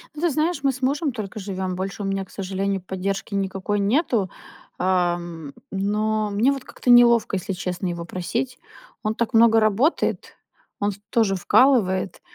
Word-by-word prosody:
Ну, 300 - -7
ты 345 - +3
знаешь, 310 0 -1
мы 275 - +3
с 265 0 -9
мужем 285 +3 0
только 215 -3 -6
живём. 190 -2 -4
Больше 195 +2 -4
у - - -3
меня, 195 0 -2
к - - -22
сожалению, 195 0 -2
поддержки 190 +2 -4
никакой 195 +1 -1
нету. 215 - +1 0.5
Ам, 175 -4 -1 0.2
но 210 +2 0
мне 220 +7 +3
вот 275 -2 -4
как-то 250 - -5
неловко, 235 -3 +6
если 195 +1 -3
честно, 180 0 -3
его 170 -1 -4
просить. 235 +9 -3 0.4
Он 215 0 0
так 235 0 -2
много 225 0 +6
работает, 220 - +1 0.4
он 205 - +1
ф - - -9
тоже 220 -4 +2
вкалывает, 190 -3 +2
200 Hz, 165 wpm, -23 LUFS, 190-235 Hz, 0.5 s, неловко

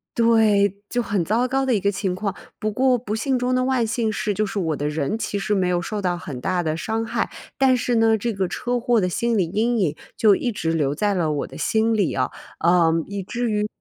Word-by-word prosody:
对， 210 -4 +3
就 245 - 0
很 200 -6 -1
糟 230 +6 +1
糕 270 +1 0
的 255 -3 +2
一 200 - 0
个 200 - +2
情 190 -2 -2
况， 200 +1 -2 0.3
不 215 - -1
过 255 +3 +3
不 220 -3 -5
幸 255 +4 0
中 250 +1 0
的 255 0 +2
万 260 -3 +1
幸 225 0 -1
是 215 -1 -1
就 215 +2 0
是 205 - -5
我 165 -5 0
的 145 - -2
人 150 +7 -1
其 205 -2 -3
实 210 +1 -1
没 190 -3 +1
有 175 -1 +1
受 210 +4 -4
到 180 -2 0
很 150 -8 -7
大 180 +6 -1
的 155 -1 -1
伤 225 +5 -2
害。 230 +1 -1 0.3
但 265 -1 +4
是 245 0 0
呢， 225 -1 +4
这 230 +2 -2
个 195 -2 -1
车 245 +6 -2
祸 235 -1 +2
的 180 - +1
心 235 +4 0
理 185 - +3
阴 225 +5 +1
影 170 -7 0 0.2
就 215 -2 +5
一 245 - 0
直 165 -5 -1
留 145 -3 0
在 205 +5 +1
了 170 -5 0
我 145 - -2
的 - - -11
心 225 +1 +1
里 205 -5 +1
啊， 130 -1 -1 0.3
呃， 170 -1 +4
以 200 0 -5
至 235 +4 -2
于 210 0 0
210 Hz, 270 characters per minute, -22 LUFS, 180-235 Hz, 0.3 s, 就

